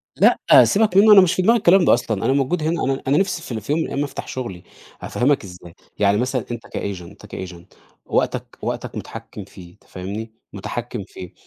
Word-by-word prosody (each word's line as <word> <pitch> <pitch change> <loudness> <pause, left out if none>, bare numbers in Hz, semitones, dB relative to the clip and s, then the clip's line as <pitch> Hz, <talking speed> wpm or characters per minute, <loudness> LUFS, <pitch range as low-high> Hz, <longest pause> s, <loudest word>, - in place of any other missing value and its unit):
لأ، - - +4 0.2
سيبك 205 -3 +2
منه، 215 +2 +7
أنا 195 - +9
مش 180 -1 +2
في 185 - 0
دماغي 230 +5 +4
الكلام 185 -2 +4
ده - - +6
أصلًا. 110 -5 -1
أنا 130 - +3
موجود 140 +4 0
هنا 165 +2 -1
أنا 135 +1 -1
أنا 140 +3 +3
نفسي 190 -3 0
في 150 - -10
ال 110 - -4
في 110 - -5
يوم 160 - +1
من - - -1
الأيّام 140 - -2
أفتح 140 - -6
شغلي. 115 -9 -6 0.4
هافَهّمك 135 0 0
ازاي، 90 -2 -12 0.3
يعني 100 0 +3
مثلًا 125 0 -1
أنت 120 -1 -7
كagent 95 -3 -5
أنت 85 - -14
كagent، 90 -2 -8 0.4
وقتك - - -2
وقتك - - -4
متحكم - - -8
فيه، 85 -2 -14
أنت - - -29
فاهمني؟ 100 +5 -7 0.2
مُتَحكِّم 120 +2 -5
فيه. 90 - -10
125 Hz, 210 wpm, -21 LUFS, 100-165 Hz, 0.4 s, أنا